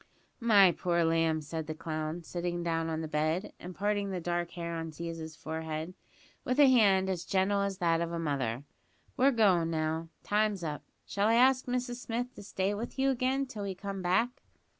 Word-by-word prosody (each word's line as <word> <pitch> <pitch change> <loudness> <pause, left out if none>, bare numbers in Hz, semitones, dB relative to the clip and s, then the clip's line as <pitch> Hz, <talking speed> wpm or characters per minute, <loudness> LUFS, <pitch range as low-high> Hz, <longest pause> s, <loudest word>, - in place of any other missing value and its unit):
"My 205 -6 +6
poor 170 0 0
lamb," 165 -1 +2
said 160 +1 -5
the 155 - -4
clown, 155 +1 -4
sitting 175 +1 -3
down 165 -1 -1
on 160 0 -2
the 160 - -4
bed, 155 +5 -1
and 180 0 -8
parting 205 0 0
the 185 -2 -3
dark 175 0 -2
hair 170 -1 -4
on 165 0 -4
Ziza's 160 0 -6
forehead, 160 +2 -5 0.5
with 255 +3 -1
a 290 - +9
hand 200 -7 +5
as 185 -2 -2
gentle 195 +2 +1
as 200 -1 -1
that 165 -2 +2
of 170 0 -2
a 170 - -2
mother, 140 -6 -2 0.5
"we're 270 +1 +5
goin' 195 -9 +3
now. 160 0 -1
Time's 210 -3 +1
up. 150 -2 -3 0.2
Shall 200 +1 0
I 225 - +4
ask 255 +2 +4
Mrs 245 0 -2
Smith 245 +1 -4
to - - -11
stay 195 0 -1
with 230 +6 -5
you 270 0 +3
again, 265 +2 0
till 235 -5 -8
we 195 -2 -3
come 195 0 -5
back?" 190 +8 +1
180 Hz, 195 wpm, -31 LUFS, 165-210 Hz, 0.5 s, a